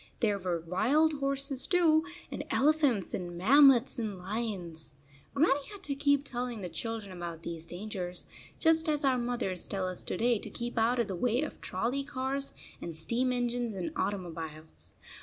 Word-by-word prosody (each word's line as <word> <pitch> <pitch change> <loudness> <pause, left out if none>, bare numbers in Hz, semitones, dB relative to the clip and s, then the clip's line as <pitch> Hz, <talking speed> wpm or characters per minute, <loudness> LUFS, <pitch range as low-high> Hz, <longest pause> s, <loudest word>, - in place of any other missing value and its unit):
There 210 -4 +2
were 180 -3 -1
wild 280 - +2
horses, 275 -1 +2
too, 325 -4 +4 0.3
and - - -4
elephants, 285 - +2
and 175 -1 -4
mammoths, 260 +4 +6
and 215 -4 -3
lions. 180 - -4 0.4
Grannie 280 -1 +3
had 405 -2 -10
to 285 - -1
keep 285 0 +2
telling 245 -4 -4
the 180 - -4
children 220 +3 -4
about 170 -2 -6
these 165 -1 -5
dangers, 180 -1 -5 0.3
just 320 -1 +3
as 295 -1 +1
our 270 - +5
27 245 -1 -1
mothers 195 -7 -2
tell 190 -2 -2
us 185 - -5
to - - -2
day 235 0 +2
to - - -7
keep 240 0 -5
out 235 +3 +3
of 235 -3 +1
the 190 - -3
way 245 - +1
of 305 - -6
trolley 245 +9 -1
cars 275 +1 -2 0.3
and 170 - -5
steam 235 +11 0
engines 245 -2 -1
and 185 -2 -3
automobiles. 160 - -5
235 Hz, 175 wpm, -31 LUFS, 180-275 Hz, 0.4 s, mammoths